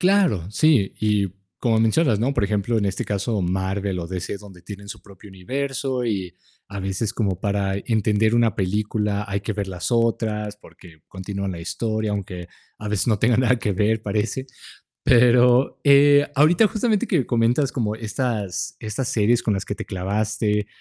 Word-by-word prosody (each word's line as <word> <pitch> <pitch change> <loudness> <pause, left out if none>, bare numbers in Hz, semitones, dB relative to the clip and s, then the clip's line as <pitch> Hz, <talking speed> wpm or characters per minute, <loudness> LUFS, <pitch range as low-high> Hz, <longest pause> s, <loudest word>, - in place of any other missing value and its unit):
Claro, 180 - +2
sí, 130 -7 +3
y 105 -2 +2 0.3
como 115 -3 +2
mencionas, 115 0 +2
¿no?, 130 +5 +1
por 100 - +1
ejemplo, 105 +3 0
en 105 - 0
este 100 -1 -2
caso, 100 +1 -1
Marvel 95 +1 -2
o 85 - -4
DC, 95 +2 -4
es 100 - -8
donde 95 -4 -14
tienen 100 +2 -10
su - - -9
propio 100 +1 -15
universo, 130 +6 -3
y 95 -6 -3 0.3
a 100 0 -7
veces, 95 +3 -2
como 100 -6 -1
para 100 -1 -1
entender 110 0 +2
una 115 -3 +3
película, 105 +1 -1
hay 100 0 -2
que 110 - -3
ver 100 -1 -3
las 90 +2 -4
otras 110 -3 0
porque 85 -6 -17
continúan 100 +1 -5
la 90 - -6
historia, 110 +4 -2
aunque 90 -3 -5 0.3
a 105 - -7
veces 105 +1 0
no 110 -3 +2
tenga 115 +2 +3
nada 125 0 +3
que 105 - -1
ver, 110 +3 +1
parece. 110 +5 -2 0.6
Pero, 125 +1 +4
eh, 145 0 +6
ahorita, 165 +9 +5
justamente 220 +1 0
que 165 - +1
comentas 120 +4 +1
como 110 -5 -2
estas 110 -4 -3
estas 110 +3 -3
series 115 +2 +2
con 110 -3 0
las 95 - -2
que - - -5
te - - -6
clavaste, 105 +2 -1
105 Hz, 175 wpm, -22 LUFS, 100-120 Hz, 0.6 s, eh